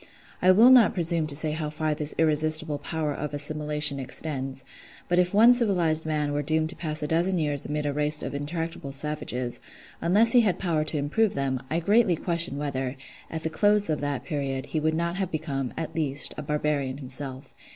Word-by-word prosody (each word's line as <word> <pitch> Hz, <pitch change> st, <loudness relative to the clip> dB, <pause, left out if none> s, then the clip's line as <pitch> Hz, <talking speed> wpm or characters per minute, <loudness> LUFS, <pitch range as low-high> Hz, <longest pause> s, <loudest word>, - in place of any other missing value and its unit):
I 185 Hz, -, +4 dB
will 220 Hz, +7 st, +7 dB
not 240 Hz, -3 st, +6 dB
presume 165 Hz, -3 st, +1 dB
to 145 Hz, -, +1 dB
say 155 Hz, +1 st, +1 dB
how 155 Hz, -1 st, -3 dB
far 155 Hz, 0 st, -2 dB
this 150 Hz, 0 st, -1 dB
irresistible 155 Hz, -1 st, +2 dB
power 155 Hz, -3 st, -3 dB
of 150 Hz, 0 st, -5 dB
assimilation 150 Hz, -1 st, 0 dB
extends; 135 Hz, -1 st, -4 dB, 0.4 s
but 175 Hz, 0 st, +2 dB
if 180 Hz, 0 st, +2 dB
one 230 Hz, +4 st, +7 dB
civilised 175 Hz, -10 st, +1 dB
man 150 Hz, -2 st, -1 dB
were 145 Hz, -, 0 dB
doomed 155 Hz, +2 st, 0 dB
to 170 Hz, -, -4 dB
pass 155 Hz, -2 st, -4 dB
a -, -, -1 dB
dozen 175 Hz, +4 st, +1 dB
years 145 Hz, -3 st, -1 dB
amid 150 Hz, 0 st, -3 dB
a 145 Hz, -, -1 dB
race 150 Hz, +1 st, 0 dB
of -, -, -5 dB
intractable 150 Hz, 0 st, -5 dB
savages, 135 Hz, -4 st, -3 dB, 0.4 s
unless 210 Hz, +7 st, +3 dB
he 245 Hz, -, +6 dB
had 200 Hz, -5 st, +1 dB
power 165 Hz, -5 st, 0 dB
to 155 Hz, -, -1 dB
improve 170 Hz, +10 st, 0 dB
them, 135 Hz, -2 st, -1 dB
I 165 Hz, -, 0 dB
greatly 200 Hz, +1 st, +3 dB
question 170 Hz, -3 st, -1 dB
whether, 135 Hz, -3 st, -3 dB, 0.3 s
at 160 Hz, -1 st, -5 dB
the 160 Hz, -, -2 dB
close 205 Hz, +1 st, +2 dB
of 150 Hz, -, -2 dB
that 145 Hz, -2 st, -3 dB
period, 135 Hz, -4 st, -3 dB
he 155 Hz, -, -2 dB
would 155 Hz, +1 st, 0 dB
not 170 Hz, +2 st, -2 dB
have 190 Hz, -3 st, -2 dB
become, 140 Hz, -6 st, -3 dB
at 165 Hz, -, -4 dB
least, 145 Hz, -3 st, +1 dB
a -, -, -6 dB
barbarian 145 Hz, -2 st, -2 dB
himself. 130 Hz, 0 st, -6 dB
155 Hz, 200 wpm, -26 LUFS, 145-170 Hz, 0.4 s, will